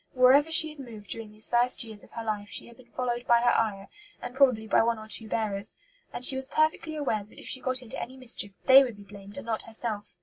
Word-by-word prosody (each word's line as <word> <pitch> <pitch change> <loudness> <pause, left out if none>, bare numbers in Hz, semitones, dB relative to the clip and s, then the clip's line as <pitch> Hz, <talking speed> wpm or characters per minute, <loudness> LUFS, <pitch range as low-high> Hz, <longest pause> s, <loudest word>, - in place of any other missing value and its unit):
Wherever 265 +5 +5
she 320 -1 +7
had 305 -1 -13
moved 220 -7 -9
during 225 -2 -4
these 215 +1 +1
first 245 +1 +2
years 220 -3 -7
of - - -17
her 230 - -6
life 210 -2 -4
she - - -5
had 235 - -16
been 250 -2 -19
followed 240 -1 -3
by 235 0 +5
her 240 - +3
ayah, 200 -3 -1 0.3
and - - -8
probably 255 -5 +3
by - - +3
one 230 0 0
or 215 0 -10
two 220 0 -3
bearers, 205 -2 -3 0.3
and 250 - -3
she 265 - +6
was 265 0 -3
perfectly 315 +2 0
aware 260 -8 -2
that 210 - -20
if - - -11
she 260 - +1
got 255 0 -1
into 245 +1 -6
any 260 +2 -8
mischief 230 -5 -1
they 265 +1 +9
would 240 -5 -6
be 205 - -13
blamed 200 +1 -12
and 280 - -8
not 225 -1 -2
herself. 220 -2 -3
235 Hz, 260 wpm, -27 LUFS, 215-260 Hz, 0.3 s, they